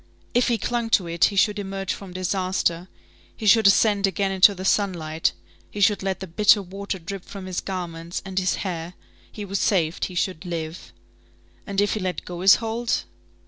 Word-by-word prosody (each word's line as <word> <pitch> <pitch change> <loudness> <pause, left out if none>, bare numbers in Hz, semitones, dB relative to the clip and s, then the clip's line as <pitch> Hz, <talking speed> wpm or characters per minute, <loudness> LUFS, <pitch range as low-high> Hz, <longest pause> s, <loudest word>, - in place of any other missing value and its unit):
If 245 +1 +3
he 235 -2 +2
clung 235 0 -2
to 185 - -9
it, 170 0 +2
he 205 - -1
should 205 +1 +2
emerge 195 -1 -3
from 195 -2 -9
disaster, 185 -1 -1 0.5
he 220 - -6
should 215 +1 +6
ascend 200 0 +4
again 195 0 -1
into 195 +1 +6
the 185 0 -6
sunlight, 170 -6 +1 0.4
he 210 - -7
should 205 +1 +3
let 195 -1 -2
the - - -3
bitter 205 +4 +4
water 195 +1 -5
drip 185 +2 -7
from 195 -2 -9
his 185 -1 -3
garments 170 -3 -5
and 190 0 -2
his 185 -1 +1
hair, 175 -1 -4 0.4
he 210 - -7
was 195 0 -2
saved, 170 -5 +1
he 185 - -8
should 185 -1 -1
live. 165 -1 -6 0.8
And 200 -1 -2
if 205 0 +2
he 215 - -2
let 185 -2 -3
go 175 -1 -6
his 195 +1 +8
hold? 230 +1 -2
190 Hz, 190 wpm, -24 LUFS, 180-200 Hz, 0.8 s, his